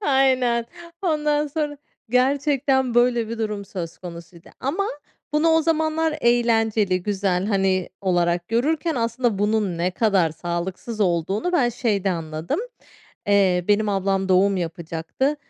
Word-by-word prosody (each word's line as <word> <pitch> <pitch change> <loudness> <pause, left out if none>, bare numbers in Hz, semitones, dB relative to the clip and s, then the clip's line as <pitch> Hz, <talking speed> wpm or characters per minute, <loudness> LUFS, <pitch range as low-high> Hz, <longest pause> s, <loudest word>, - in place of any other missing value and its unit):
aynen. 260 - +2 0.4
Ondan 300 -3 +1
sonra, 295 0 -3 0.3
gerçekten 265 0 +2
böyle 240 -2 +3
bir 230 - -5
durum 210 -2 -3
söz 170 -4 -7
konusuydu, 170 -1 -11
ama 340 +10 -1 0.5
bunu 315 +2 +3
o 320 0 +4
zamanlar 315 -1 0
eğlenceli 225 -5 +2
güzel, 195 -2 0
hani 190 -3 +1
olarak 175 -2 0
görürken 305 +8 0
aslında 235 -2 0
bunun 205 -4 0
ne 180 +2 +1
kadar 190 -4 +2
sağlıksız 175 +7 -5
olduğunu 190 - 0
ben 270 -9 +3
şeyde 210 -5 0
anladım: 160 - -3 0.7
Eee, 190 -3 +3
benim 210 +1 +3
ablam 195 -1 0
doğum 190 +1 +4
yapacaktı. 170 - -2
215 Hz, 125 wpm, -23 LUFS, 185-265 Hz, 0.7 s, o